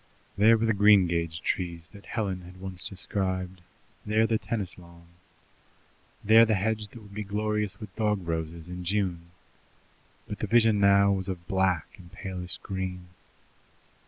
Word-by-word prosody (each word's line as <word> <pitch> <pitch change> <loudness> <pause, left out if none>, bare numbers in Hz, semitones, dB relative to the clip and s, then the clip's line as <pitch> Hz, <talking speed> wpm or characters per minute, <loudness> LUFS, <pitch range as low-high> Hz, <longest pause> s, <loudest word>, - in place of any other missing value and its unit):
There 110 +3 +6
were 115 - 0
the 115 - +3
greengage 90 -5 +3
trees 85 -3 -3
that 100 -1 -14
Helen 100 -5 -2
had 90 +1 -13
once 95 -1 -3
described, 95 -2 -3 0.4
there 110 +1 +2
the 110 -1 +1
tennis 100 -6 -4
lawn, 85 -1 -16 1.2
there 110 +2 +7
the 110 -1 +3
hedge 105 +2 -1
that 110 +2 -13
would 100 -1 -14
be 105 - -4
glorious 105 0 -2
with 105 -4 -10
dog 105 -5 0
roses 80 0 -4
in 90 0 -6
June, 90 -3 -1 1.0
but - - -6
the - - -2
vision 115 -2 +4
now 100 0 +5
was 95 -1 -1
of 90 -3 -5
black 95 -3 0
and 85 -2 -14
palest 95 -2 -6
green. 90 -2 -5
95 Hz, 155 wpm, -28 LUFS, 90-105 Hz, 1.2 s, there